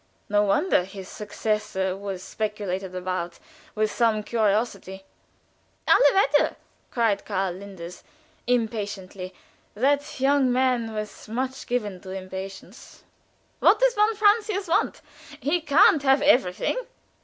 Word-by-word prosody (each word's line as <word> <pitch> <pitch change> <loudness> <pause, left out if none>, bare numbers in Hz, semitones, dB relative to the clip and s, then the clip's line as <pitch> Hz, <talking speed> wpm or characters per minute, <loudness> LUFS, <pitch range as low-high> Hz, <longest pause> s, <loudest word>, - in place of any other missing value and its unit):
No 205 0 +3
wonder 210 - +2
his 190 0 -9
successor 210 -3 -2
was 195 -2 -6
speculated 195 -4 -4
about 180 -2 -3 0.4
with 215 0 +1
some 220 -3 +1
curiosity. 205 -3 -1 0.8
"Alle - - +6 0.2
Wetter!" 290 -6 +3 0.3
cried 225 -4 +1
Karl 195 -3 -2
Linders, 185 -2 -10 0.4
impatiently 205 -6 -2 0.4
that 280 +5 0
young 270 -1 +3
man 250 -3 +1
was 215 -1 -6
much 260 +3 -3
given 210 -7 -2
to 190 - -11
impatience 190 +2 -8 0.6
"what - - +5
does - - +4
von 425 +1 +2
Francius 415 -1 +2
want? 335 - 0 0.4
He 330 +5 0
can't 310 0 +5
have 270 0 +3
everything. 250 - +2
215 Hz, 115 wpm, -25 LUFS, 190-265 Hz, 0.8 s, Alle